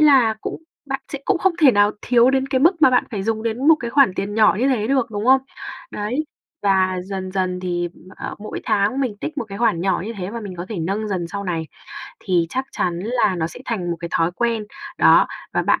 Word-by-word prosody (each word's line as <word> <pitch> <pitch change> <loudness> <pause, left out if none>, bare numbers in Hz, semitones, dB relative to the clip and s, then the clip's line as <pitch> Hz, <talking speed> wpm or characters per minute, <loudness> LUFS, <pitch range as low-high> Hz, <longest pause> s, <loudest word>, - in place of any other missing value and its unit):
là 265 -7 +5
cũng 320 - -6 0.2
bạn 270 -1 -3
sẽ 280 - -3
cũng 400 -3 +1
không 380 +1 +2
thể 295 -4 +8
nào 205 0 +4
thiếu 245 0 +4
đến 270 0 0
cái 265 -1 +1
mức 330 +2 +3
mà 260 - +8
bạn 250 - +3
phải 205 -4 -3
dùng 220 +1 -1
đến 230 +6 0
một 320 - +9
cái 235 - -4
khoản 270 -8 +4
tiền 200 +2 -3
nhỏ 215 -2 +4
như 265 - +3
thế 225 -5 +1
được, 260 -3 +1
đúng 210 0 -3
không? 265 +1 +6 0.5
Đấy, 245 +9 -2 0.4
và 190 -2 +2
dần 190 -1 -5
dần 185 -1 -1
thì, 175 -1 -2 0.3
ờ, - - -6
mỗi 215 +1 -6
tháng 205 +6 +1
mình 245 -6 -1
tích 310 -2 -4
một 240 - -2
cái 200 0 -7
khoản 230 -8 +2
nhỏ 190 -1 0
như 230 - -4
thế 185 +1 -4
và 230 +1 -5
mình 195 -4 -7
có 175 - -6
thể 215 - -3
nâng 200 +6 -2
dần 185 -4 -2
sau 200 +2 -5
này 165 -3 -2 0.5
thì 175 -4 +1
chắc 260 +1 -2
chắn 175 -1 -1
là 225 -1 +1
nó 160 -2 -1
sẽ 170 - -10
thành 185 -7 -2
một - - -4
cái 170 - -4
thói 165 +1 +2
quen, 230 +1 -1 0.3
đó, - - +6 0.2
và - - +1
bạn - - +2
215 Hz, 245 wpm, -21 LUFS, 185-255 Hz, 0.5 s, một